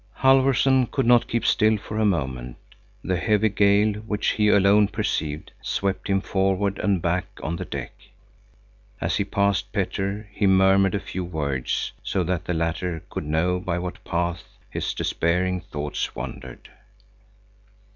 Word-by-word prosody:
Halfvorson 135 -1 +4
could 135 -3 -1
not 120 0 +5
keep 115 -1 -1
still 110 -1 +3
for 105 +1 -5
a 110 - +3
moment. 65 -9 -2 0.5
The 95 -1 0
heavy 105 +3 +2
gale, 100 +1 +3
which 105 -1 -1
he 105 -1 +2
alone 100 0 +5
perceived, 75 -5 -3
swept 100 0 -2
him 95 -1 +1
forward 95 0 0
and 100 -3 +1
back 90 +1 0 0.2
on 85 +2 -2
the - - -5
deck. - - -5 1.1
As - - 0
he - - +1
passed 100 -1 0
Petter, 100 +2 -2
he 100 - +1
murmured 95 0 +4
a - - 0
few 95 +1 -5
words, 70 -7 -2
so 95 - -1
that 90 +1 -2
the 90 - -1
latter 85 0 -2
could - - -4
know 85 +4 +1
by 90 -1 -2
what 90 0 -5
paths 85 -1 -2 0.3
his - - -2
despairing 90 +2 0
thoughts 75 -5 -4
wandered. 65 +2 -8
95 Hz, 150 wpm, -24 LUFS, 85-105 Hz, 1.1 s, not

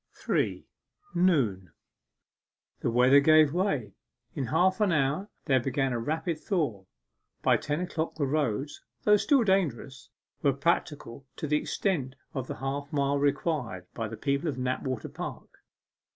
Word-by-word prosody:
3. - - -1 0.5
NOON 130 - +2 1.1
The - - -1
weather 125 +4 +6
gave 155 0 +5
way. 145 - -1 0.4
In 135 -5 -3
half 185 +5 +2
an 205 -3 +3
hour 155 +6 0 0.2
there 135 -4 +3
began 135 +1 -1
a 120 - -1
rapid 160 +6 -2
thaw. 140 - -2 0.6
By - - +4
ten 150 +3 -2
o'clock 165 -3 -3
the 150 - 0
roads, 140 -1 -1 0.2
though 210 0 +6
still 275 +3 +3
dangerous, 145 - -1 0.3
were 140 -2 +3
practicable 140 -3 -2
to - - -4
the 150 0 +2
extent 150 -6 -1 0.2
of 130 -2 -4
the - - -5
half 140 +1 -4
mile 140 -1 +1
required 140 - -1
by 115 -2 -3
the - - -7
people 140 +3 0
of 140 - -4
Knapwater 130 -1 -2
Park. - - -7
140 Hz, 145 wpm, -28 LUFS, 130-160 Hz, 1.1 s, weather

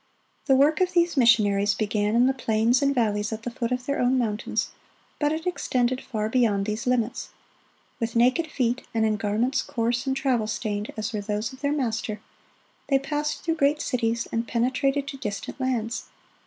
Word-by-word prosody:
The 270 - +5
work 295 +5 +4
of 365 0 +2
these 345 -1 +3
missionaries 210 -5 +4
began 210 0 0
in 240 +1 +5
the 265 - +3
plains 230 0 +2
and 280 0 +2
valleys 210 -3 0
at 220 0 -5
the 245 - -4
foot 235 0 -3
of 250 0 -2
their 280 - -1
own 250 +1 +3
mountains, 220 -3 -1 0.5
but 295 -1 +2
it 320 +2 -3
extended 255 -8 0
far 215 -4 -3
beyond 220 -4 +2
these 215 +3 -3
limits. 245 -2 0 0.7
With 230 0 -2
naked 255 +8 +3
feet 250 -3 0
and 220 -1 +3
in 215 -1 +2
garments 220 +6 0
coarse 240 +3 -1
and 265 0 0
travel 255 -6 +1
stained 215 -1 -3
as 215 +2 -3
were 210 - -2
those 210 +3 -3
of 260 - -13
their 285 0 +1
Master, 225 -6 -2 0.7
they 275 - +4
passed 295 +2 -3
through 330 -1 0
great 290 +1 +2
cities, 235 -4 -1
and 230 0 -1
penetrated 270 +4 0
to 275 - -6
distant 210 +2 -5
lands. 245 -3 -1
240 Hz, 185 wpm, -25 LUFS, 220-270 Hz, 0.7 s, The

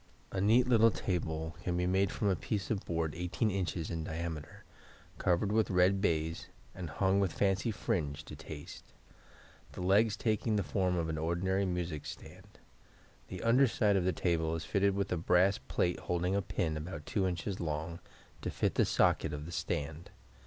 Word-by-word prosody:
A 95 - -1
neat 115 +5 +5
little 115 -2 +6
table 80 -5 -2
can 90 -1 -1
be 90 - +1
made 95 +1 +2
from 105 - -1
a 95 - +3
piece 95 +7 -3
of 100 -3 -1
board 80 -2 -1
18 90 +6 -1
in. 95 -2 -1 0.2
in 80 -2 -3
diameter, 80 -1 -5 0.6
covered 90 +3 +2
with 110 0 +2
red 95 +1 +3
baize, 80 -1 0 0.3
and 90 -4 -6
hung 95 +6 +2
with 95 -3 +1
fancy 95 +4 +1
fringe 80 -10 -2
to - - -8
taste; 75 -2 -10 0.8
the - - -6
legs 100 +4 +3
taking 110 0 0
the 100 - +1
form 90 -1 0
of 85 -1 0
an 80 -1 -2
ordinary 95 +4 0
music 85 -4 -3
stand. - - -11 0.7
The 95 - -7
under 125 +4 +5
side 105 -3 +2
of 95 - +2
the 95 - +3
table 80 -2 0
is 80 - -4
fitted 100 -1 +2
with 100 0 -1
a 90 - +1
brass 90 +4 +3
plate 90 - -1
holding 90 +2 -1
a 100 - +2
pin, 90 -4 -1
about 75 -1 -6
2 95 -3 0
in. 90 - 0 0.2
long, 80 +1 -3 0.4
to - - -2
fit - - 0
the - - +3
socket - - +2
of 75 0 -5
the 85 - -7
stand. 80 0 -3
90 Hz, 185 wpm, -32 LUFS, 80-100 Hz, 0.8 s, little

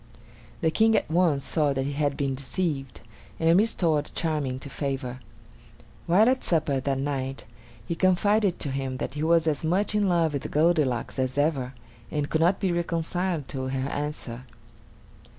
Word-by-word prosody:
The 160 - +2
King 220 +4 +4
at 210 - 0
once 165 -5 +2
saw 150 -3 +1
that 135 0 -1
he 140 - -2
had 145 -1 -1
been 140 -1 0
deceived, 135 0 -3 0.4
and 165 +1 +4
restored 165 -9 +1
Charming 150 -6 -1
to - - -7
favor. 135 -2 -4 0.9
While 190 +6 +5
at 260 +1 +2
supper 150 -5 +2
that 135 +1 -1
night, 135 -1 -3 0.4
he 170 - -2
confided 185 +2 +2
to 145 - -2
him 135 -1 -3
that 130 - -4
he 150 - -4
was 165 +1 +3
as 155 -1 0
much 185 +6 +1
in 205 -2 +2
love 165 -3 +2
with 145 +1 -3
Goldilocks 150 -6 +1
as 130 +1 -1
ever, 140 -4 0 0.3
and 150 -1 -2
could 160 - +1
not 175 +4 +3
be 190 - 0
reconciled 170 -2 -1
to 130 -1 -4
her 130 +1 -2
answer. 140 -5 -5
150 Hz, 170 wpm, -26 LUFS, 135-170 Hz, 0.9 s, While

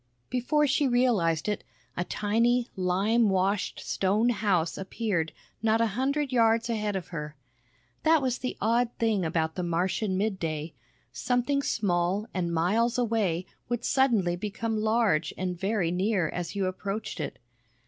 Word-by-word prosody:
Before 275 +5 +2
she 285 0 +2
realized 215 -10 +2
it, 210 - -1 0.3
a 175 - -1
tiny, 235 +6 +1
lime 200 +5 +2
washed 190 +1 0
stone 205 +5 +1
house 195 -7 +1
appeared 190 -4 -2 0.3
not 225 0 +2
a 230 - +4
hundred 275 +4 0
yards 230 -1 +3
ahead 210 -2 -1
of 190 - -4
her. 150 -3 -6 0.7
That 320 0 +5
was 255 -3 -1
the 255 - -4
odd 235 +3 +2
thing 220 -4 +1
about 160 -1 0
the 180 - -3
Martian 185 +3 0
midday; 165 -7 -2 0.4
something 245 - 0
small 195 -4 0
and 175 -2 -1
miles 210 +9 +1
away 215 -8 0 0.2
would 240 -1 -2
suddenly 225 -10 +2
become 215 +3 -3
large 215 -9 +1
and 180 -1 -2
very 190 -1 0
near 185 -2 +1
as 175 +2 -4
you 195 -1 0
approached 195 +3 -4
it. - - -4
210 Hz, 145 wpm, -28 LUFS, 180-235 Hz, 0.7 s, That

